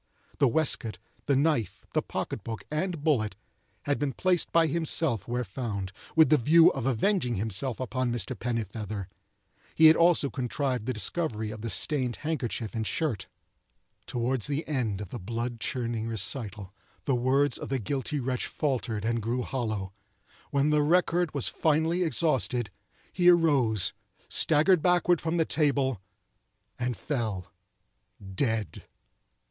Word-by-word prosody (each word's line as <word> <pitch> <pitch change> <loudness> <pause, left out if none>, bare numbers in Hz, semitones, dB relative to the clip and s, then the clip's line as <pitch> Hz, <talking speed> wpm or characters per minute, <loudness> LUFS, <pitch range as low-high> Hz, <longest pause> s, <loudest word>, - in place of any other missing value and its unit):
The 140 - +5
waistcoat, 125 -5 +1 0.3
the 140 - +3
knife, 140 - 0
the - - +2
pocket - - -4
book, 115 -1 -6
and 165 0 -2
bullet, 110 -11 +1 0.5
had 145 -1 0
been 145 -2 -1
placed 180 +2 +1
by 165 -1 +4
himself 155 - -1
where 120 +1 -1
found, 100 -3 -4 0.2
with 160 -4 +6
the 155 - +5
view 160 +7 +6
of 120 - -3
avenging 130 - +1
himself 110 +5 -2
upon 130 0 -1
Mr. 115 -5 -3
Pennifeather. 110 -4 -4 0.7
He 160 - +6
had 160 0 +9
also 165 -5 +3
contrived 130 -2 -2
the - - +1
discovery 110 -3 -2
of 110 0 -8
the 115 - -4
stained 125 - 0
handkerchief 125 -8 -2
and 110 -2 -2
shirt. 120 - -2 0.8
Toward 125 0 -1
the 145 +6 -1
end 120 -9 -1
of 100 - -7
the - - -6
blood 115 +4 -4
chilling 115 -2 -2
recital 105 -3 -1 0.3
the 135 - +1
words 130 +4 +2
of - - -6
the 135 - 0
guilty 140 +5 -2
wretch 125 -1 -2
faltered 125 -7 -2
and 115 0 0
grew 120 +3 -1
hollow. 110 -8 -3 0.6
When 140 +1 +2
the 150 0 +3
record 175 +1 +2
was 140 - +2
finally 160 +3 +1
exhausted, 125 - +1 0.4
he 180 -1 +5
arose, 140 - +3 0.3
staggered 160 +3 +4
backward 175 -1 +3
from 165 +2 -1
the 165 - +3
table, 140 - +1 0.8
and 125 -1 -2
fell—dead. 100 - -4
130 Hz, 140 wpm, -28 LUFS, 110-150 Hz, 0.8 s, had